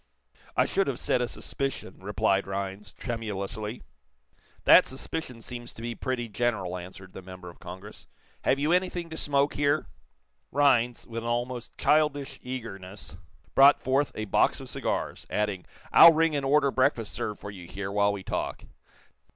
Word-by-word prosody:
"I - - +5
should - - +1
have - - -1
said 125 - +1
a 125 - 0
suspicion," 135 -6 -5
replied 100 0 +1
Rhinds, 95 0 -4
tremulously. 110 -1 -4 0.8
"That - - +8
suspicion 130 -3 -5
seems 120 0 -6
to - - -11
be 120 0 -3
pretty 120 -1 -3
general," 105 -4 -1
answered 95 +1 -9
the - - -8
member 90 -1 -10
of - - -21
Congress. 95 +4 -10 0.4
"Have 135 - +3
you 150 +3 +1
anything 180 -2 0
to - - -5
smoke 140 -1 +1
here?" 145 0 +1 0.7
Rhinds, 125 -4 +3
with 115 -1 -5
an 115 - -3
almost 120 0 -3
childish 150 -2 +2
eagerness, 105 -8 -7 0.4
brought 140 +1 +7
forth 135 +2 +1
a 110 - -3
box 100 - +2
of - - -9
cigars, - - -3
adding: 105 -3 -1 0.3
"I'll 170 - +10
ring 160 -1 +2
and 140 - -1
order 140 0 +4
breakfast 120 -4 +1
served 105 -1 -3
for 100 - -7
you 90 -3 -10
here, 95 +2 -5
while 100 0 +3
we 100 -2 -5
talk." - - -3
115 Hz, 160 wpm, -28 LUFS, 100-135 Hz, 0.8 s, I'll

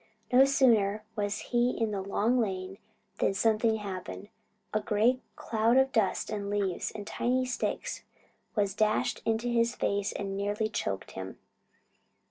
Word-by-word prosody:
No 260 +2 +8
sooner 220 -7 +3
was 205 -1 -1
he 240 +1 +2
in 225 -2 +1
the 200 -2 -2
Long 210 +6 +1
Lane 190 -3 -2 0.4
than 195 - +2
something 220 +1 +3
happened. 200 -1 -6 0.4
A 215 - +2
great 225 +5 +2
cloud 225 +2 +2
of 265 0 +4
dust 220 -4 +1
and 205 -2 -3
leaves 200 -3 -1
and 210 -2 -7
tiny 255 +4 0
sticks 250 - -3 0.5
was 200 -3 +1
dashed 215 +1 +1
in 225 -1 +2
his 235 0 +1
face 200 0 0
and 195 -1 -4
nearly 205 +2 -1
choked 100 - -3
him. 95 0 -7
215 Hz, 145 wpm, -29 LUFS, 200-235 Hz, 0.5 s, No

